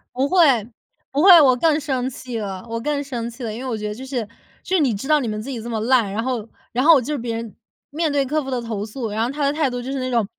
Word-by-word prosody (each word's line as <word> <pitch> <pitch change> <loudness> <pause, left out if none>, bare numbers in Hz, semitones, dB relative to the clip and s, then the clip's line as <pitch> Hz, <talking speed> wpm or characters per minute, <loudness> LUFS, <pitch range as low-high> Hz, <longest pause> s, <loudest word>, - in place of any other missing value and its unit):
不 265 +2 +1
会 370 - 0 0.7
不 280 - +1
会， 360 -2 +9
我 260 -3 +5
更 310 +3 +2
生 265 -4 -2
气 250 -2 -7
了 195 -1 -5
我 230 0 -3
更 285 +3 -1
生 240 -4 -4
气 240 +2 -10
了。 220 -2 -3
因 225 - -6
为 260 - -4
我 230 - -2
觉 210 0 -4
得 210 - -3
就 255 +5 -9
是 250 -5 -3 0.4
就 375 - -1
是 - - +4
你 265 -6 +2
知 210 +6 -5
道 305 0 +4
你 255 - -3
们 215 -1 -3
自 230 - -8
己 245 -4 -4
这 235 - -7
么 225 -2 -2
烂， 235 -3 +2
然 220 +3 -2
后 245 -4 -2 0.2
然 250 +2 0
后 330 +3 +8
我 280 - +5
就 295 +5 -3
是 - - -1
别 235 -2 -3
人 230 -2 -6 0.4
面 310 +1 -1
对 280 -1 +1
客 300 +3 -1
户 270 - -6
的 250 -2 -1
投 220 -3 -4
诉， 225 +1 -5
然 215 +2 -1
后 235 - -1
他 290 +1 -3
的 280 - +2
态 300 -2 +1
度 245 0 -4
就 255 +2 -5
是 275 - -2
那 255 0 -2
种 230 -3 +2
250 Hz, 340 characters per minute, -21 LUFS, 230-280 Hz, 0.7 s, 会